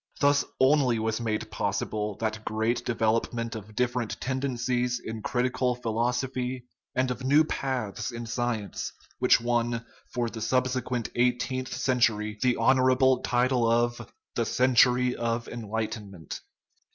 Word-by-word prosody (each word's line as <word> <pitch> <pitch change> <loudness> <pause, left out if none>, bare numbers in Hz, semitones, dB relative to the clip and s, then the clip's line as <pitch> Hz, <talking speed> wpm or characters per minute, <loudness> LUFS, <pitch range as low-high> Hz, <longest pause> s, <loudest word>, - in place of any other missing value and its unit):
Thus 145 0 +4 0.2
only 130 -3 +4
was 110 +1 -1
made 110 -1 -2
possible 105 +1 -2
that 110 0 -2
great 110 +3 0
development 115 0 0
of 110 0 -9
different 120 -2 -1
tendencies 125 -2 -1
in 110 -1 -6
critical 125 +1 0
philosophy 125 +2 -2 0.3
and 130 0 +1
of 125 +1 -5
new 145 +4 +5
paths 125 -7 -3
in 120 0 -6
sci 120 +1 -1
ence 105 -2 -5 0.3
which - - +5
won 120 0 0 0.3
for 120 -1 -1
the 115 -1 -6
subsequent 125 0 0
eighteenth 125 +1 0
century 110 -4 +1
the 125 -1 +3
honorable 130 0 +4
title 125 -1 +2
of 120 0 0
* - - -59
the 115 - +1
century 125 0 +4
of 115 0 -2
enlightenment." 110 -5 -5
120 Hz, 130 wpm, -27 LUFS, 110-125 Hz, 0.3 s, new